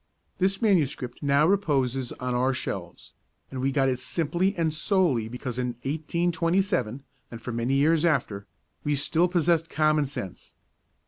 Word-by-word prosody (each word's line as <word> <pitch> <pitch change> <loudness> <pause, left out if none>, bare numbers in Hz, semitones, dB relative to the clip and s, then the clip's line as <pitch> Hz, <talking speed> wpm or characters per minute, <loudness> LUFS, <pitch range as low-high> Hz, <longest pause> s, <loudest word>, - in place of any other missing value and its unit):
This 195 +3 +1
manuscript 145 - +1
now 140 +1 +3
reposes 135 -9 +1
on 125 0 -4
our 130 +2 +1
shelves, - - -6 0.4
and 130 -1 -4
we 135 +1 +1
got 135 -1 +2
it 130 -1 0
simply 170 +8 0
and 160 -2 0
solely 155 - +1
because 125 0 -5
in 125 -1 -1
1827 165 - 0 0.3
(and 115 - -8
for 120 +2 -6
many 120 +3 0
years 155 +3 +3
after) 120 -11 0 0.4
we 145 0 +1
still 160 +5 +2
possessed 170 -2 +1
common 155 -1 +2
sense. 100 -9 -7
145 Hz, 145 wpm, -26 LUFS, 125-170 Hz, 0.4 s, now